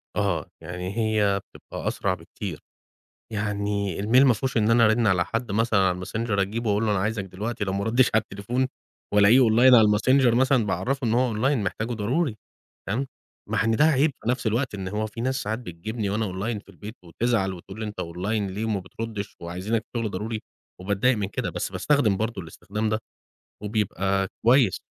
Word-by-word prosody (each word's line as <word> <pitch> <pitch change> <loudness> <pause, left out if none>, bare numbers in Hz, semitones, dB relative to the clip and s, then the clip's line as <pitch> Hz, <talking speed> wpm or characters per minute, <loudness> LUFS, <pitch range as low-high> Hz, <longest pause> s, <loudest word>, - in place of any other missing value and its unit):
آه - - 0 0.2
يعني 90 +4 -5
هي 105 -3 +2
بتبقى - - -8
أسرع - - 0
بكتير، - - -7 0.7
يعني 100 -2 -2
الmail 125 +6 +5
ما 125 - +5
فيهوش 130 +3 -3
إن 110 0 +3
أنا 115 0 +5
أرِن 110 +1 +3
على 90 -3 +3
حد 115 -2 -3
مثلًا 110 -1 +2
على 90 -1 +1
الMessenger 115 +4 -3
أجيبه 110 +3 -1
أقول 105 +2 +1
له - - +1
أنا 100 - +1
عايزك 105 0 -1
دلوقتي 105 +3 -4
لو 95 - -2
ما 100 +1 -1
ردّيتش 120 +3 +3
على 110 - +4
التليفون 120 +7 -2 0.5
وألاقيه 105 +5 +6
online 120 +2 +6
على 110 -3 +7
الMessenger 120 +3 +4
مثلًا 130 -3 +3
باعرفه 120 +8 -1
إن 110 - +1
هو 125 -2 +2
online 135 +6 +2
محتاجه 115 +5 -2
ضروري 120 +4 -1 0.5
تمام؟ 130 +7 -1 0.4
مع 110 -1 +1
إن 115 -1 +2
ده 150 - +4
عيِْب 150 0 +4
في - - -2
نَفْس 125 -2 -2
الوقت 120 +2 0
إن 95 -2 -4
هو 105 +2 -2
فيه 115 +2 -7
ناس 130 +1 -1
ساعات 110 +2 -2
بتجيبني 105 +1 -4
وأنا 110 +1 0
online 105 +3 -3
في - - -28
البيت 105 +4 -10
وتزعل 95 +2 0
وتقول 95 +4 -10
لي 110 - -3
أنت 105 - -6
online 95 +4 -2
ليه 105 +3 -3
وما 105 -3 -1
بتردّش 105 +2 -6
وعايزينك 95 +7 -2
في 120 - -2
شغل 110 -3 -1
ضروري 110 +3 -4 0.4
وبتضايق 100 +6 +1
من 100 -2 -2
كده، - - -3
بس - - -4
باستخدم 130 -10 +2
برضه 110 -3 -3
الاستخدام 105 +6 -4
ده 110 0 0 0.7
وبيبقى 95 -2 0 0.2
كويس. 120 -6 +4
110 Hz, 195 wpm, -25 LUFS, 100-115 Hz, 0.7 s, على